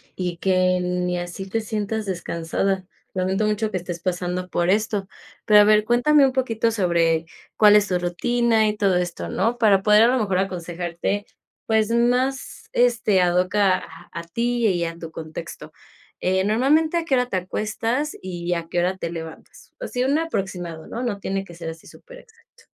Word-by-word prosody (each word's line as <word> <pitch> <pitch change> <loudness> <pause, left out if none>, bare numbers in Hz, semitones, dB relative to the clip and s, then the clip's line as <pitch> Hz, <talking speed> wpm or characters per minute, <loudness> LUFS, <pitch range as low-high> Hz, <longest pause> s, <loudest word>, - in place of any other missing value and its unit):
y 180 -2 -3
que 185 0 +2
ni 180 0 -1
así 175 +2 -6
te 225 +2 -1
sientas 215 0 -3
descansada. 185 +1 -2 0.3
Lamento 190 +3 0
mucho 215 +1 0
que 185 - -1
estés 175 -1 -6
pasando 180 0 -2
por 175 +1 0
esto, 205 -1 0 0.4
pero 210 -1 +7
a - - +8
ver, 210 0 +4
cuéntame 275 +5 +4
un 265 - +2
poquito 230 -3 0
sobre 170 -5 +1 0.3
cuál 210 -1 +7
es 210 0 +4
tu 180 - +1
rutina 220 +5 +1
y 210 0 -1
todo 195 -3 +2
esto, 175 -1 -3
¿no?, 235 +2 0
para 205 -5 +4
poder 210 +2 +5
a - - +6
lo 255 +1 +2
mejor 195 -4 0
aconsejarte, 175 +1 -3 0.4
pues, 220 -1 +2
más, 250 +3 0
este, 235 -5 +2
ad 175 0 +2
hoc 185 +3 +1
a 195 -3 +3 0.3
a 170 - -5
ti 235 +6 0
y 175 -3 +1
a 165 0 -5
tu 165 -1 -8
contexto. 155 -1 -8 0.5
Eh, 190 +1 +2
normalmente, 290 +10 +2
¿a 335 - 0
qué 275 -5 +1
hora 250 0 +1
te 195 - -4
acuestas 225 +9 -2
y 175 -1 -3
a 170 -1 -4
qué 175 - 0
hora 180 +2 +1
te 170 - -4
levantas? 160 -1 -10
Así, 250 - -2
un 285 +3 +2
aproximado, 180 - -4
¿no?, 240 +2 -5
no 205 -5 -2
tiene 195 0 -2
que 175 - -13
ser 165 -1 -6
así 165 0 -10
súper - - -14
exacto. 465 -1 -23
195 Hz, 185 wpm, -23 LUFS, 175-230 Hz, 0.5 s, a